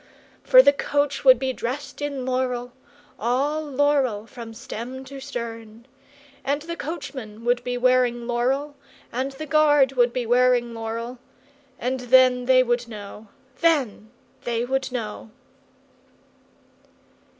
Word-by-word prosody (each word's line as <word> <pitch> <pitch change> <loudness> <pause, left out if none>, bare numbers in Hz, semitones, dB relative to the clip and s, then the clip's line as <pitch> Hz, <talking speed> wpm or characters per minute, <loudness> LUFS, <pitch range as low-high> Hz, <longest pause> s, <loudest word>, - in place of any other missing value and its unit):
For - - +7
the 280 - +6
coach 285 0 -1
would 260 -2 +8
be 260 +1 -2
dressed 265 +5 -5
in 280 -3 -3
laurel, 250 -1 -2 0.5
all 275 +7 0
laurel 275 -6 +1
from 230 -1 -10
stem 255 +2 -7
to 275 +1 -9
stern! 230 -4 -7 0.6
And 285 +2 -1
the 335 +1 -5
coachman 265 -9 -7
would 245 0 +1
be 245 0 -2
wearing 245 -1 +2
laurel, 265 +5 -1 0.4
and 265 +3 -3
the 310 +3 -7
guard 295 -3 +4
would 245 -2 +2
be 245 0 -2
wearing 245 0 +3
laurel; 230 +2 -5 0.6
and 255 +2 -2
then 250 0 +4
they 255 0 +5
would 240 -1 -1
know, 210 -1 -10 0.3
then 275 -10 +1 0.3
they 235 0 -1
would 265 +1 -2
know!" 225 -3 -5
255 Hz, 130 wpm, -24 LUFS, 235-275 Hz, 0.6 s, would